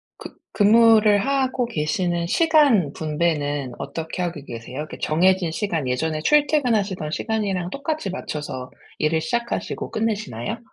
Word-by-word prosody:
그 - - -10 0.2
근무를 215 0 +5
하고 265 -2 0
계시는 170 -2 -1
시간 285 - +3
분배는 150 -4 -1
어떻게 165 +3 -5
하고 170 -4 -3
계세요? 115 +2 -8
이렇게 150 +1 -6
정해진 180 +2 +2
시간 165 -7 -2
예전에 155 +5 -1
출퇴근하시던 230 - +2
시간이랑 195 -5 -2
똑같이 285 -6 -3
맞춰서 145 -8 -5 0.3
일을 160 +1 +1
시작하시고 235 +2 -3
끝내시나요? 215 - -3
185 Hz, 340 characters per minute, -22 LUFS, 155-230 Hz, 0.3 s, 근무를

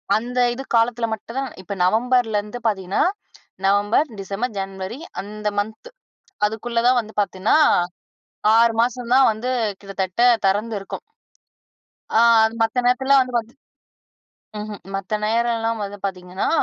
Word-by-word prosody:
அந்த 245 +3 -2
இது 265 +2 -6
காலத்தில 230 0 +2
மட்டும் 230 +3 -7
தான் 270 -2 -3
இப்ப 200 +2 -6
நவம்பர்ல 225 +2 +2
இருந்து 210 +4 -8
பார்த்தீங்கன்னா, 190 -3 -1 0.6
நவம்பர், 205 +9 +3
டிசம்பர், 200 +4 -3
ஜன்வரி 195 +3 -5 0.2
அந்த 210 +1 -6
மன்த் 220 - -5 0.6
அதுக்குள்ள 230 +2 -2
தான் 250 0 +4
வந்து 220 -1 -13
பார்த்தீன்னா 190 +1 0 1.0
6 230 0 +5
மாசம் 245 0 -1
தான் 265 0 +6
வந்து 220 +4 -5 0.3
கிட்டத்தட்ட 195 +1 -2 0.2
தெறந்து 210 +4 0
இருக்கும். 195 - -7 1.2
ஆ - - +6 0.4
மத்த 225 +2 +1
நேரத்தில்லாம் 265 +2 +4
வந்து 250 -1 -7
பாத் 230 +1 -4 1.1
ம்ஹ்ம். 210 -1 -6
மத்த 195 +2 -2
நேரம்லாம் 230 0 0
வந்து 200 +1 -7
பார்த்தீங்கன்னா, 185 -1 -3
220 Hz, 125 wpm, -21 LUFS, 200-240 Hz, 1.2 s, தான்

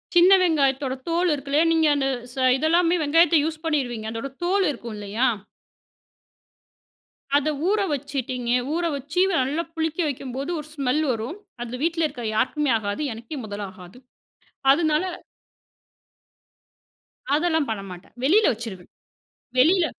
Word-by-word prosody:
சின்ன 365 +3 +7
வெங்காயத்தோட 280 -6 +2 0.2
தோல் 345 +2 +2
இருக்குல்லையா? 285 +2 +1
நீங்க 320 -1 +3
அந்த 275 -1 0 0.3
ச - - -16 0.2
இதெல்லாமே 335 +4 +3
வெங்காயத்தை 325 +1 +4
யூஸ் 320 0 -4
பண்ணீருவீங்க. 245 -8 -1
அதோட 230 +4 -4 0.2
தோல் 385 +2 +2
இருக்கும் 235 -5 -7
இல்லையா? 210 +5 0 2.1
அத 290 +1 0 0.2
ஊற 415 +1 +2
வச்சுட்டீங்க. 260 -3 -3 0.2
ஊற 345 +1 0
வச்சு, 290 +6 -4 0.2
நல்லா 280 +6 0
புளிக்க 320 0 -2
வைக்கும்போது 270 0 -4
ஒரு 300 - -8
ஸ்மெல் 280 +1 0
வரும். 240 - -4 0.2
அதுல 240 +1 -5
வீட்ல 330 0 +1
இருக்க 250 -5 -8
யாருக்குமே 290 +5 +1
ஆகாது. 205 +5 -3
எனக்கே 230 +7 -8
முதல் 205 -1 -5
ஆகாது. 185 +2 -14 0.8
அதனால 310 +2 +2 2.3
அதெல்லாம் 320 -2 +1
பண்ணமாட்டேன். 195 -4 -7
வெளியில 400 +10 +5
வச்சுருவேன். 215 -6 -8 0.7
வெளியில 340 +6 +5
285 Hz, 120 wpm, -24 LUFS, 240-325 Hz, 2.3 s, சின்ன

